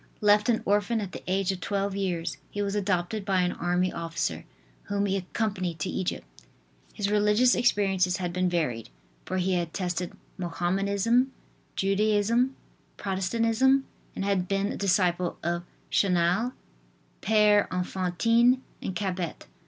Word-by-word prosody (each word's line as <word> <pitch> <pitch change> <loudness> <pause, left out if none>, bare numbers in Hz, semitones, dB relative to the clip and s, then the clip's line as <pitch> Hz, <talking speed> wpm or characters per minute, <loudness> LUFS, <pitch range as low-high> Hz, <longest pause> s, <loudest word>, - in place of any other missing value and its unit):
Left 210 +2 +4
an 230 - +2
orphan 210 +3 +2
at 200 -3 -4
the - - -7
age 195 +1 +1
of 190 - -5
twelve 200 +2 -1
years 180 -4 -2
he 205 - -3
was 200 0 -2
adopted 195 0 -1
by 190 -2 +2
an 180 0 +1
army 180 +1 0
officer, 165 - -3 0.4
whom 200 0 0
he 195 -1 0
accompanied 185 -2 -2
to 155 - -3
Egypt. 185 - -3 0.7
His 205 -1 -2
religious 210 +4 +4
experiences 195 -6 +2
had 175 -2 -3
been 180 0 +1
varied, 140 -10 -1 0.4
for 185 - -2
he 185 +1 +1
had 170 -2 -2
tested 180 -2 -2 0.3
Mohamedanism, 200 +8 +1 0.4
Judaism, 215 +6 +2 0.4
Protestantism 230 +7 +2 0.3
and 195 - -2
had 195 -3 +1
been 195 +2 0
a - - -4
disciple 180 -2 +1
of 175 +1 -1 0.3
Chanel, 185 +6 +2 0.7
Pere 210 -1 +4
Enfantine 230 +8 +2 0.2
and 190 - -4
Cabet. 185 -4 -3
195 Hz, 135 wpm, -27 LUFS, 180-210 Hz, 0.7 s, Left